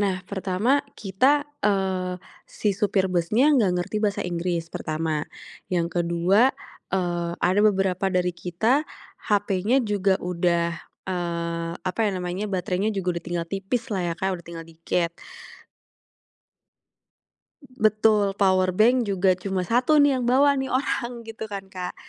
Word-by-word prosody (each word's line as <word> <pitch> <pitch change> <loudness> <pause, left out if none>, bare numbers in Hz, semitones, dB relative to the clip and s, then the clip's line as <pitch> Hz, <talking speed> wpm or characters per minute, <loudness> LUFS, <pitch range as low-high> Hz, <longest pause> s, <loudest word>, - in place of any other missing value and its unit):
Nah 190 -2 -1
pertama 200 +8 0 0.2
kita, 260 +9 +2 0.2
eee, 190 -3 0 0.3
si 210 - -1
supir 195 -1 +1
busnya 215 - +3
gak 215 -9 +3
ngerti 180 +4 -3
bahasa 205 -1 0
Inggris 170 -1 -2
pertama. 155 -1 -2 0.4
Yang 175 -1 0
ke-2, 175 +8 +3 0.4
eee, 175 -2 -1
ada 185 +4 +2
beberapa 195 -2 +2
dari 180 -1 0
kita, 185 - 0 0.5
hapenya 205 +5 +2
juga 200 -2 +1
udah, 170 -1 0 0.4
eee, 170 -2 -2
apa 185 +4 -4
ya - - 0
namanya, 180 +3 -3
baterainya 185 +1 -1
juga 180 -2 -1
udah - - -33
tinggal 170 -1 -3
tipis 200 +7 -3
lah 190 - -1
ya - - -5
Kak, 190 -1 -2
udah - - -20
tinggal 165 -1 -8
dikit. 165 +1 -2 2.6
Betul, 215 -3 +2
powerbank 195 +5 +3
juga 190 -2 +2
cuma 190 0 -2
1 250 - +3
nih 280 -2 +3
yang 245 - -2
bawa 275 +3 +4
nih 265 - -1
orang, 245 -2 -1
gitu 220 -1 -7
kan 195 -2 -7
Kak. 180 -1 -5
190 Hz, 135 wpm, -24 LUFS, 175-215 Hz, 2.6 s, bawa